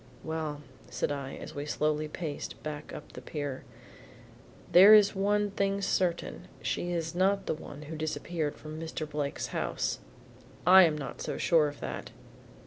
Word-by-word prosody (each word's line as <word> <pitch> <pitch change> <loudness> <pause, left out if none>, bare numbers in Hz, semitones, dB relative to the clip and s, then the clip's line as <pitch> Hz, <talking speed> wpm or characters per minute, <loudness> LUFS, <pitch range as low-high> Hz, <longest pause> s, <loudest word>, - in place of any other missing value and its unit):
"Well," 155 -2 -3 0.3
said - - -1
I 140 -2 -4
as - - -8
we 145 - -4
slowly 150 0 0
paced 150 -1 -6
back 150 0 -6
up 150 - -9
the - - -9
pier, 145 -3 -5 1.1
"there 195 +5 +10
is 205 -2 +6
one 205 +1 +1
thing 200 0 0
certain, 180 -2 -1
she 175 - -2
is 165 -1 -2
not 195 +3 +2
the - - 0
one 150 -1 -9
who 155 +2 -7
disappeared 155 0 -2
from 155 0 -8
Mr. 160 -1 -4
Blake's 145 -1 -3
house." - - -1 0.7
"I 185 +1 +9
am 155 -2 +1
not 135 -4 -6
so - - -3
sure 160 -3 +4
of 145 0 -8
that." - - -5
160 Hz, 160 wpm, -30 LUFS, 150-185 Hz, 1.1 s, there